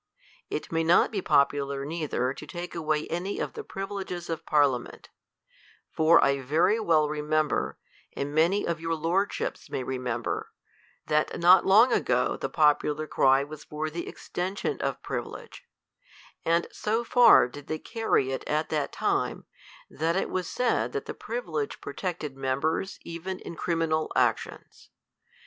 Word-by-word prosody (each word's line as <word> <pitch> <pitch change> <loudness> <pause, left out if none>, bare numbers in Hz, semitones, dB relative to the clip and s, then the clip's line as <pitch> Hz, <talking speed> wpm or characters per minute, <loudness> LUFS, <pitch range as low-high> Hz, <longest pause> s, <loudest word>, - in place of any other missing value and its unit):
It 150 - -4
may 165 0 +1
not 170 +3 +4
be 200 -4 -2
popular 140 -2 +1
neither 150 -5 -2
to - - -10
take 175 0 -6
away 155 -2 -1
any 180 +4 -3
of - - -3
the 445 - -6
privileges 195 - -5
of 165 - -5
parliament: 140 -5 +1 0.8
for 160 +1 +5
I 140 0 +2
very 160 - +2
well 160 -8 +3
remember, 150 0 -1 0.4
and 140 +1 -4
many 170 +6 +3
of 170 -1 -2
your 165 0 -1
lordships 175 +6 -1
may 130 - -3
remember, 125 -3 -3 0.6
that 150 0 0
not 180 +2 +6
long 225 +6 +6
ago - - +1
the - - -4
popular 150 0 +2
cry 135 -2 +3
was 150 +1 -9
for 155 +1 -4
the 170 +2 -5
extension 185 +3 -4
of - - -3
privilege; 475 - -6 0.8
and 170 +1 +2
so 220 +3 -1
far 245 - +6
did 145 +3 -11
they 155 - -2
carry 190 - 0
it 135 - -3
at 155 +1 0
that 150 -2 -1
time, - - -1 0.4
that 165 +3 -1
it 190 - -1
was 185 -2 -2
said 250 -2 0
that 430 0 -3
the - - -5
privilege 455 -3 -4
protected 165 -7 -5
members 140 +8 -1
even 170 +3 -5
in - - -8
criminal 165 -2 -1
actions. - - -1
160 Hz, 150 wpm, -27 LUFS, 150-185 Hz, 0.8 s, not